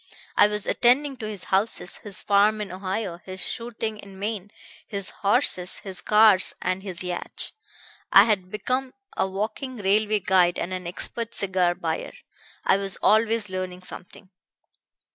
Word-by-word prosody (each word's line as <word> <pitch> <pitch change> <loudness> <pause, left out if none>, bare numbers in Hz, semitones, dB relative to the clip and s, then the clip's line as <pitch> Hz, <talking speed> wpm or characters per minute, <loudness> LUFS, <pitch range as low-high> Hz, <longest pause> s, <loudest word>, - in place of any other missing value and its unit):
I - - +6
was 210 -1 -3
attending 270 +3 +2
to 220 -3 -5
his 210 -3 -6
houses, 195 -2 0
his 205 -3 0
farm 205 +1 +3
in 210 -3 -5
Ohio, 185 -1 -4
his 185 0 -8
shooting 225 0 -4
in 195 -2 -12
Maine, 205 -1 -4 0.4
his 200 -3 -3
horses, 200 -4 +1
his 190 -2 -7
cars 210 -3 +5
and 185 +1 -2
his 185 -3 -3
yacht. 180 -1 0 0.6
I 195 - +9
had 205 -4 0
become 255 +6 -2 0.2
a - - +1
walking 220 +7 -4
railway 210 +1 +2
guide 180 -2 +3
and 185 - -3
an 180 -1 -5
expert 230 +6 -5
cigar 185 -3 +1
buyer. - - -4 0.5
I - - +4
was 195 -1 -1
always 220 0 +3
learning 185 -1 -5
something. 185 +1 -12
200 Hz, 150 wpm, -25 LUFS, 185-220 Hz, 0.6 s, I